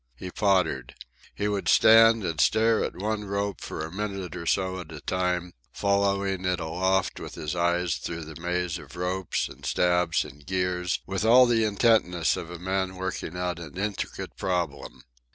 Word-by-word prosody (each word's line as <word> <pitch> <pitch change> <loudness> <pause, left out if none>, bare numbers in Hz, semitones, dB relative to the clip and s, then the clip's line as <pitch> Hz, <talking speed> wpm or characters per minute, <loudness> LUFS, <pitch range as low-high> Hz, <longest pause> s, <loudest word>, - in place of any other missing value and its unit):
He 90 +8 -7
pottered. 90 - +1 0.4
He 105 - -1
would 100 -1 -2
stand 115 0 +6
and 80 -5 -1
stare 110 - +3
at - - -4
one 105 +2 -2
rope 100 0 -2
for 80 - -5
a 80 - -9
minute 100 -2 -4
or 85 -1 -6
so 95 0 0
at 85 -3 -9
a 75 - -8
time, 90 +2 -1 0.2
following 100 -1 0
it 90 -1 0
aloft 95 +3 0
with - - -8
his 75 +2 -4
eyes 85 0 +1
through 85 -1 -5
the 80 +1 -10
maze 90 0 -1
of - - -13
ropes 90 +1 -1
and - - -14
stabs 90 -2 +2
and 70 +2 -13
gears 90 +1 -1
with 95 +1 -2
all 125 +3 +7
the 115 -2 +2
intentness 100 -6 +2
of 85 - -6
a 85 - -7
man 95 +1 -2
working 90 -2 -4
out 90 -2 -2
an 85 0 -9
intricate 100 +1 -4
problem. 90 -2 -3
90 Hz, 175 wpm, -26 LUFS, 85-100 Hz, 0.4 s, all